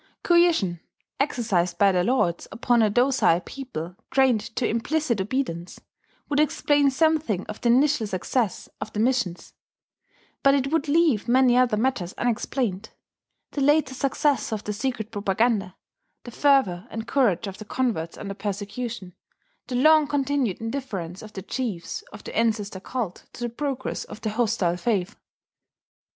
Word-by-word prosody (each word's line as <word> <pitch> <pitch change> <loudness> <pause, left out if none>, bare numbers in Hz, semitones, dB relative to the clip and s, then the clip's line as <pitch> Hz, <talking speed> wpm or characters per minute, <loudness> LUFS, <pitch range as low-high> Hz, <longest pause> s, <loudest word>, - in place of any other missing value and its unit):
Coercion, 340 - +3 0.4
exercised 205 - 0
by 200 +1 +5
their 180 -1 +2
lords 180 -7 +1
upon 240 0 +2
a 215 - +4
docile 245 -6 +3
people 180 - -7
trained 265 -5 +3
to 245 - +1
implicit 240 0 0
obedience, 190 -6 -3 0.5
would 290 -1 0
explain 290 -1 +3
something 300 - +1
of 215 - -8
the 240 - +2
initial 260 -1 +3
success 200 +3 -1
of 210 +1 -5
the 210 - -3
missions; 230 -7 0 0.9
but 275 0 +5
it 275 0 0
would 320 -1 +1
leave 295 -8 +3
many 250 0 +4
other 250 -4 +3
matters 220 -7 -1
unexplained: 230 -3 -1 0.6
the 285 - -3
later 290 -1 +3
success 275 0 0
of 215 -2 -3
the 210 - -3
secret 225 -1 -3
propaganda, 205 -1 0 0.5
the 240 - -9
fervour 235 -9 +2
and 225 0 -6
courage 220 -11 +2
of 195 -1 -7
the 215 - -8
converts 210 -9 -2
under 200 -1 -5
persecution, 205 0 -5 0.5
the 250 - -4
long 310 +3 +5
continued 280 -7 0
indifference 220 -8 -5
of 215 -1 -11
the 190 - -7
chiefs 210 -6 -4
of - - -11
the - - -8
ancestor 215 -4 0
cult 215 -2 -5
to 240 - -7
the 240 - -1
progress 260 +1 -3
of - - -10
the 215 -1 -2
hostile 215 -6 +1
faith.... 205 -2 -1
235 Hz, 150 wpm, -25 LUFS, 200-270 Hz, 0.9 s, by